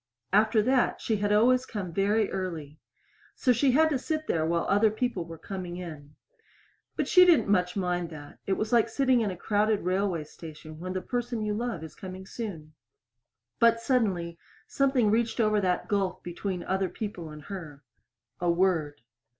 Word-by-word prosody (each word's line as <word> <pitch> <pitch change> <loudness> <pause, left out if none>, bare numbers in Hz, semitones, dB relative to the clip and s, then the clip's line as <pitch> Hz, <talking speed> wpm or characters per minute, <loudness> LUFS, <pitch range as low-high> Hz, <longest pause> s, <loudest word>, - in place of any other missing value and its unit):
After 215 +1 +4
that 255 +1 +2
she 220 - 0
had 205 0 0
always 250 +5 +4
come 190 -6 -5
very 205 +3 +2
early. 165 -6 -5 0.6
So 250 - +3
she 255 +2 +3
had 315 +3 +4
to 275 - +1
sit 310 +3 -2
there 160 - 0
while 170 0 0
other 205 +3 +4
people 215 -5 -2
were 165 0 -9
coming 180 -1 -6
in. 150 -5 -9 0.8
But - - -1
she 365 - +7
didn't 345 - +4
much 180 -3 +2
mind 180 -3 -1
that; 145 -3 -11
it 195 - +2
was 215 +4 -2
like 230 -1 +4
sitting 255 0 +2
in 215 - 0
a 185 - -5
crowded 210 +2 +1
railway 185 -2 0
station 155 0 -11
when 185 +2 -5
the 185 - -3
person 240 -2 -2
you 210 0 -1
love 225 -6 -3
is 160 - -9
coming 190 0 -9
soon. 175 -9 -7 0.9
But 230 0 +5
suddenly 195 -9 0 0.3
something 265 -6 +2
reached 230 +2 +1
over 215 -2 +3
that 180 -2 0
gulf 195 -3 -1
between 180 +1 -4
other 190 0 -1
people 185 -6 -6
and 150 -1 -10
her. 155 -7 -8 0.6
A 175 - 0
word. 170 -5 +1
195 Hz, 175 wpm, -28 LUFS, 170-230 Hz, 0.9 s, she